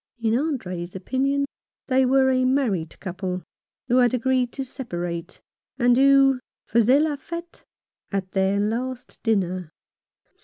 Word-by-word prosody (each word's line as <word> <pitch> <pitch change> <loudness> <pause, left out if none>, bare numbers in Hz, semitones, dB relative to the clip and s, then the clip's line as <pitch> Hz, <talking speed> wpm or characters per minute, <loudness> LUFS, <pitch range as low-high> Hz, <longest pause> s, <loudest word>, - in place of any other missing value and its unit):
In 225 -1 +1
Andre's 185 - -3
opinion 275 +8 0 0.4
they 260 -1 +3
were 265 0 +4
a 255 0 +2
married 245 - 0
couple, 185 -1 -4 0.4
who 250 0 +3
had 245 -1 +4
agreed 250 0 +1
to 270 - -4
separate, 175 - -5 0.4
and 245 -1 +4
who 270 0 +5 0.3
faisaient 245 +6 +4
la 310 -2 0
fete 335 +4 -8 0.5
at 195 -2 -2
their 195 +1 +1
last 245 +4 -3
dinner. 185 -6 0
245 Hz, 125 wpm, -24 LUFS, 190-265 Hz, 0.5 s, who